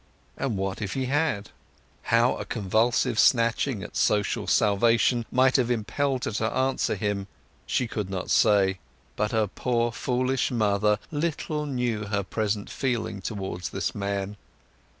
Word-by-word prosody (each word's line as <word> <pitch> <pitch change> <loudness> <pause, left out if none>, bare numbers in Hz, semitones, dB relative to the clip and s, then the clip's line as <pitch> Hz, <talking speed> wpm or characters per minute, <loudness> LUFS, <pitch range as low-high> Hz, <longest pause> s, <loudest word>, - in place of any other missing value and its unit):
And 115 -7 -2
what 95 +2 -3
if 100 -3 -3
he 135 -1 -1
had? 135 -7 0 0.5
How 115 +2 +3
a - - -4
convulsive 115 +3 +1
snatching 115 -1 +3
at - - -9
social 105 -1 +1
salvation 115 +3 +3
might 130 +2 +4
have 125 -2 +1
impelled 125 +3 -1
her - - -2
to 110 +1 -1
answer 130 0 0
him 105 -2 -2 0.4
she 125 - +1
could 105 -4 -4
not 95 -1 -4
say. 95 -2 +4 0.4
But 105 0 -1
her 110 -1 +2
poor 120 +3 -1
foolish 125 +3 0
mother 105 -3 +2
little 150 0 -2
knew 120 -5 -1
her 100 -1 -1
present 105 +1 -2
feeling 115 -6 -2
towards 95 -4 -4
this - - -2
man. 100 0 -3
110 Hz, 145 wpm, -26 LUFS, 100-125 Hz, 0.5 s, might